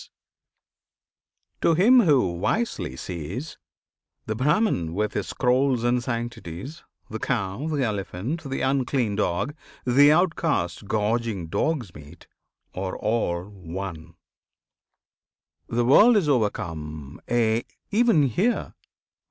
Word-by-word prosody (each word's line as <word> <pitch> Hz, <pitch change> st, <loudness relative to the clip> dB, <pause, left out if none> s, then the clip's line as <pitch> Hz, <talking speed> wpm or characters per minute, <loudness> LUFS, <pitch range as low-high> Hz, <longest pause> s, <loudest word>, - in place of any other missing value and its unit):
] -, -, -56 dB
To 165 Hz, -, +4 dB
him 235 Hz, +9 st, +6 dB
who 145 Hz, -, +4 dB
wisely 220 Hz, -, -1 dB
sees, 90 Hz, -, -6 dB, 0.7 s
The 110 Hz, -, -2 dB
Brahman 130 Hz, -, +1 dB
with 105 Hz, +1 st, -1 dB
his -, -, -2 dB
scrolls 125 Hz, -1 st, +1 dB
and 120 Hz, 0 st, +2 dB
sanctities, 120 Hz, -, -5 dB, 0.3 s
The 110 Hz, -, -4 dB
cow, 110 Hz, +3 st, -2 dB
the 150 Hz, -4 st, 0 dB
elephant, 105 Hz, -, -3 dB
the 135 Hz, -, -3 dB
unclean 130 Hz, -5 st, 0 dB
dog, 100 Hz, +6 st, -1 dB, 0.3 s
The 140 Hz, +4 st, +6 dB
Outcast 155 Hz, -, 0 dB
gorging 110 Hz, -4 st, -1 dB
dog's 130 Hz, -, -1 dB
meat, 75 Hz, +3 st, -13 dB, 0.5 s
are 95 Hz, 0 st, -4 dB
all 105 Hz, -6 st, -1 dB
one. 95 Hz, -3 st, -8 dB, 1.5 s
The 120 Hz, +1 st, 0 dB
world 215 Hz, -, +7 dB
is 185 Hz, -7 st, +1 dB
overcome 80 Hz, -, -2 dB
aye! 115 Hz, -1 st, +2 dB, 0.3 s
even 220 Hz, -7 st, +4 dB
here! 190 Hz, -, 0 dB
115 Hz, 110 wpm, -25 LUFS, 95-145 Hz, 1.5 s, world